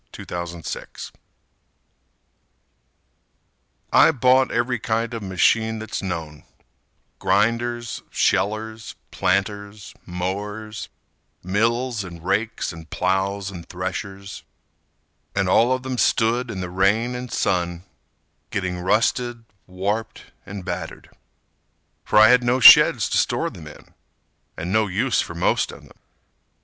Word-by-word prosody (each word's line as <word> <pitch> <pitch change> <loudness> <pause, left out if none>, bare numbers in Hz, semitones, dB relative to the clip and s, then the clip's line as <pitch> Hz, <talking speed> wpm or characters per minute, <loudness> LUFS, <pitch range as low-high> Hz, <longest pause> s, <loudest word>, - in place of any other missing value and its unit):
Abel - - -8
Melveny 85 -1 -7 2.8
I - - +7
bought 130 -2 +3
every 125 -1 0
kind 115 +1 -1
of 115 - -4
machine 110 +4 +1
that's 110 0 -5
known— 80 -5 -5 0.8
Grinders, 115 +2 0
shellers, 110 +2 -1 0.2
planters, 100 +2 -2
mowers, 105 +4 -5 0.5
Mills 115 +4 0
and 85 -2 -10
rakes 105 +1 -1
and 80 -2 -12
ploughs 95 +2 -1
and 85 -3 -10
threshers— 100 0 -6 0.9
And 95 -1 +1
all 115 +6 +4
of 130 0 0
them 130 -2 -3
stood 120 +2 +2
in 95 -4 -5
the 90 -1 -5
rain 100 +6 +2
and 125 0 -6
sun, 85 -1 -1 0.7
Getting 90 -2 -3
rusted, 115 +5 0 0.2
warped 100 +4 -4 0.2
and 100 -2 -7
battered, 85 -2 -6 0.9
For - - +1
I 110 0 +8
had 125 0 +6
no 120 +2 +2
sheds 120 - +8
to - - +2
store - - 0
them 80 -3 -11
in, 75 - -14 0.6
And 90 +3 -4
no 110 -1 +3
use 110 +7 +1
for 85 - -7
most 85 - +1
of - - -13
them. - - -19
105 Hz, 115 wpm, -22 LUFS, 95-115 Hz, 2.8 s, I